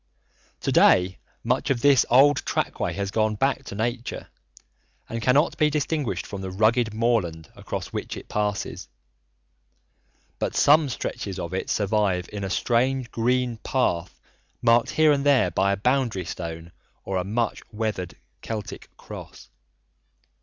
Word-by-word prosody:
To - - -1
day, 90 0 +4 0.2
much - - 0
of 130 -4 +1
this 140 -3 +5
old 140 +3 +6
trackway - - -2
has 100 -1 -3
gone 110 0 +1
back 135 +4 0
to - - -7
nature 120 +3 -3 0.8
and 115 0 -4
cannot 140 +7 +2
be 155 -1 +4
distinguished 145 - -1
from 100 -1 -7
the 95 - -4
rugged 110 +4 +2
moorland 105 -9 -1
across - - -6
which - - -4
it - - -10
passes, 105 -1 -2 1.5
but - - -2
some 150 0 +5
stretches 100 -5 -4
of 90 -1 -5
it 95 - -3
survive 100 -3 +1
in 100 -1 -4
a 95 - -2
strange 125 +5 0
green 125 0 0
path 95 -8 -1 0.4
marked 115 0 +3
here 155 -1 +4
and 140 -1 +1
there 140 -11 +4
by 95 +4 +2
a 100 - 0
boundary 120 -4 0
stone 85 0 -6 0.3
or 95 - -2
a 90 - 0
much 115 +5 -1
weathered 105 -5 -3 0.3
Celtic 105 -2 -6
cross. - - -11
110 Hz, 145 wpm, -25 LUFS, 95-130 Hz, 1.5 s, old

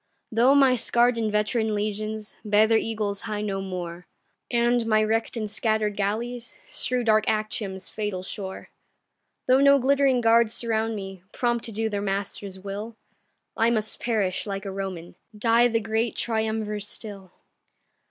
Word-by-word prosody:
Though 240 +5 +5
my 270 -2 +6
scarr'd 240 0 +3
and 220 -2 -1
veteran 215 +1 0
legions 215 +1 -3
Bear 210 0 +4
their 225 0 +4
eagles 210 -3 -2
high 210 -2 -3
no 195 -2 -2
more, 180 -2 -6 0.4
And 240 -1 +2
my 215 -1 +4
wreck'd 225 +2 0
and 215 -2 -2
scatter'd 215 -1 0
galleys 235 +4 -3
Strew 250 0 -1
dark 215 -1 +3
Actium's 215 -3 -1
fatal 205 -4 -3
shore, 190 0 -7 0.7
Though 255 +1 +5
no 280 0 +7
glittering 270 -1 +3
guards 230 -1 +4
surround 225 -1 0
me, 195 -2 -7
Prompt 240 -1 0
to 230 - -6
do 220 +1 -1
their 205 -2 -2
master's 195 -1 -3
will, 205 +4 -6 0.6
I 225 +1 +3
must 220 -2 -1
perish 210 -5 -1
like 195 0 -4
a 195 - -4
Roman, 190 -3 -6 0.2
Die 230 +2 +4
the 230 -1 +1
great 225 +1 -1
Triumvir 220 -2 -1
still. 205 -2 -7
215 Hz, 150 wpm, -25 LUFS, 205-230 Hz, 0.7 s, no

